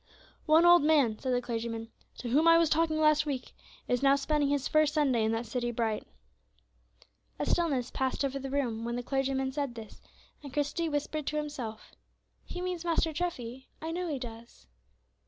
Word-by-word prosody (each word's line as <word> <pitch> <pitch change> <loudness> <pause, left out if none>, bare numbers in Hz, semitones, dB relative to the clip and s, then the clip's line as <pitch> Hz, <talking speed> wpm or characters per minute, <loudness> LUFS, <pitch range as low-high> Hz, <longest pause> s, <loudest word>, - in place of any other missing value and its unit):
"One 315 +2 +6
old 345 0 +8
man," 285 -8 +3
said 260 - -2
the 245 0 +1
clergyman, 230 -1 -4 0.3
"to 245 - -5
whom 300 +7 +3
I 330 0 +8
was 335 -2 +3
talking 315 -1 +2
last 305 0 +4
week 265 -3 -4 0.3
is 245 - +1
now 275 0 +5
spending 290 0 +1
his 285 -1 0
first 310 -1 +3
Sunday 265 -7 +2
in 220 - +1
that 225 +1 -2
city 240 +1 -2
bright." 225 -2 -2 1.3
A - - -2
stillness 275 -8 0
passed 265 +1 -1
over 275 0 -2
the 270 0 -5
room 245 -5 -1
when 235 +1 -2
the 245 - -3
clergyman 270 0 -1
said 275 -3 -3
this, 220 -2 -10 0.4
and 285 -2 -9
Christie 295 +4 -1
whispered 290 0 -2
to 300 - -1
himself, 275 -8 -5 0.5
"He 360 - -7
means 360 -2 -3
Master 330 -2 +1
Treffy, 265 -7 -4
I 320 +1 -4
know 355 +1 -2
he 300 -4 -2
does." 235 - -10
275 Hz, 185 wpm, -30 LUFS, 245-310 Hz, 1.3 s, old